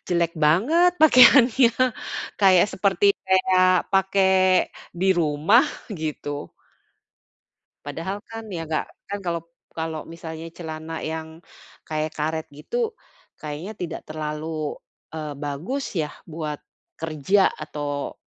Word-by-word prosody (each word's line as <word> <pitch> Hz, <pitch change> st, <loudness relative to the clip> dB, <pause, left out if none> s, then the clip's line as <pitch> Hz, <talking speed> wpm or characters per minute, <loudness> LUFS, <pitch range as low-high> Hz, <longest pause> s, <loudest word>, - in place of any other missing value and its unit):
jelek 170 Hz, -2 st, +1 dB
banget 260 Hz, -, +3 dB
pakaiannya," 255 Hz, -4 st, +7 dB, 0.7 s
kayak 190 Hz, -3 st, +6 dB
seperti 200 Hz, +1 st, +3 dB
kayak 185 Hz, -1 st, +4 dB
pakai 190 Hz, -1 st, +3 dB, 0.3 s
di 190 Hz, +2 st, +1 dB
rumah, 165 Hz, -, +4 dB, 0.3 s
gitu. 150 Hz, -3 st, -5 dB, 1.4 s
Padahal 165 Hz, +7 st, -4 dB
kan 225 Hz, 0 st, -7 dB
ya 165 Hz, -3 st, -4 dB
gak 155 Hz, 0 st, -1 dB, 0.2 s
kan 205 Hz, +1 st, -4 dB
kalau 170 Hz, -2 st, -2 dB, 0.3 s
kalau 160 Hz, -1 st, -4 dB
misalnya 165 Hz, 0 st, -8 dB
celana 160 Hz, -1 st, -7 dB
yang 160 Hz, 0 st, -7 dB, 0.5 s
kayak 155 Hz, 0 st, -2 dB
karet 160 Hz, +1 st, -2 dB
gitu, 440 Hz, -, -3 dB, 0.5 s
kayaknya 155 Hz, +7 st, -6 dB
tidak 170 Hz, -2 st, -5 dB
terlalu, 155 Hz, 0 st, -4 dB, 0.4 s
eee, 155 Hz, -2 st, -5 dB
bagus 155 Hz, -, -4 dB
ya 155 Hz, -4 st, -1 dB, 0.2 s
buat 155 Hz, -2 st, -5 dB, 0.4 s
kerja 165 Hz, +5 st, +2 dB
atau 145 Hz, -2 st, -5 dB
165 Hz, 105 wpm, -24 LUFS, 155-190 Hz, 1.4 s, pakaiannya